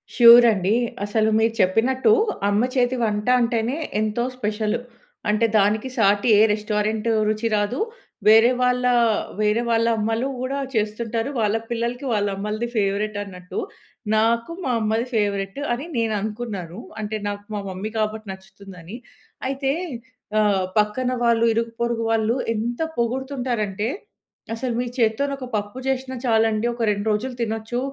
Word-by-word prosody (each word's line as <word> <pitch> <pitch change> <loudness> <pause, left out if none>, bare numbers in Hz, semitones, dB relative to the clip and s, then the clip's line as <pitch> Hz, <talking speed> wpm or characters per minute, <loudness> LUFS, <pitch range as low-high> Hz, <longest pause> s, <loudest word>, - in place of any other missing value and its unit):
Sure 240 0 +9
అండి. 195 +2 +1 0.3
అసలు 215 +1 +1
మీరు 225 0 +2
చెప్పినట్టు 255 - +3 0.4
అమ్మ 205 +3 +2
చేతి 255 0 +2
వంట 210 0 -1
అంటేనే 235 +3 0 0.2
ఎంతో 215 +2 0
స్పెషల్. 215 0 -1 0.5
అంటే 215 +2 +3
దానికి, 210 +4 +1
సాటి 205 0 +3
ఏ - - +5
రెస్టారెంట్ 210 +1 -1 0.2
రుచి 215 +2 0
రాదు. 205 +5 -1 0.5
వేరే 225 +3 +7
వాళ్ళ, 250 0 +2 0.6
వేరే 210 +2 +2
వాళ్ళ 230 0 +2
అమ్మలు 225 +4 0
కూడా 265 +2 -2 0.2
చేస్తుంటారు. 225 +2 -1
వాళ్ళ 215 -1 +1
పిల్లలకి 235 +3 -2
వాళ్ళ 205 -1 +1
అమ్మలది 210 +4 -3
ఫేవరెట్ 205 0 0
అన్నట్టు. 180 -2 -7 0.6
నాకు 230 +5 +1
మా 255 - 0
అమ్మది 220 +2 0
ఫేవరెట్ 200 +1 -1
అని 265 +6 -4
నేను 225 -1 +1
అనుకున్నాను. 210 -4 -5 0.2
అంటే 215 +1 -3
నాకు 205 0 -4
మా 205 - -2
మమ్మీ 190 +4 -5
కాబట్టి 215 0 -2
నచ్చుతుందని. 190 0 -12 0.5
అయితే 270 0 -1 0.7
ఆహ్, 200 -3 +2
పక్కన 210 +5 +1
వాళ్ళు 230 -1 +3
ఇరుగు, 230 +1 -1
పొరుగు 235 -1 0
వాళ్ళు 225 +1 +1 0.2
ఎంత 235 +2 -3 0.2
పొగుడుతుంటారంటే, 240 -4 -2 0.7
"అసలు 240 +2 -3
మీ 250 - 0
చేత్తోని 245 +4 +1
ఒక 265 -2 -7
పప్పు 205 +4 -3
చేసినా 260 0 -2
చాలండి 225 -1 +2
ఒక 235 0 -6
2 205 0 -1
రోజులు 245 +5 -2
తినొచ్చు 225 +1 -2
220 Hz, 140 wpm, -22 LUFS, 210-240 Hz, 0.7 s, Sure